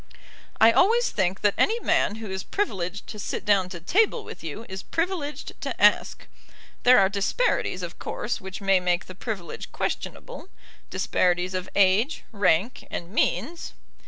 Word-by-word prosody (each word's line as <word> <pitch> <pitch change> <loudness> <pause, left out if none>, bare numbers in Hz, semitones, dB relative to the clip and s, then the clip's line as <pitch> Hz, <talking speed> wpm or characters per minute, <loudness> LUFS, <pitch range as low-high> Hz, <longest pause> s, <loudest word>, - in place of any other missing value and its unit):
"I 225 +1 +8
always 445 - +3
think 190 -1 0
that 205 -1 +3
any 455 +2 +3
man 210 - +1
who 220 -3 -7
is 190 0 -3
privileged 195 - -3
to 210 - -8
sit - - -4
down 195 -3 +3
to 175 -2 -7
table 425 - +2
with - - -10
you 165 +8 -6
is 190 0 -6
privileged 330 -4 -3
to - - -4
ask. - - +3 0.6
There 250 +1 +7
are 195 - +6
disparities 200 - 0
of - - -7
course - - -3
which 190 +1 -7
may 195 -1 +4
make 180 0 0
the 185 - -10
privilege 190 -2 -6
questionable, 485 -6 -5 0.4
disparities 180 0 +1
of 185 0 -3
age, 200 +9 +3
rank, 200 +2 +1
and 175 +1 -6
means." 240 - -1
200 Hz, 160 wpm, -25 LUFS, 185-290 Hz, 0.6 s, I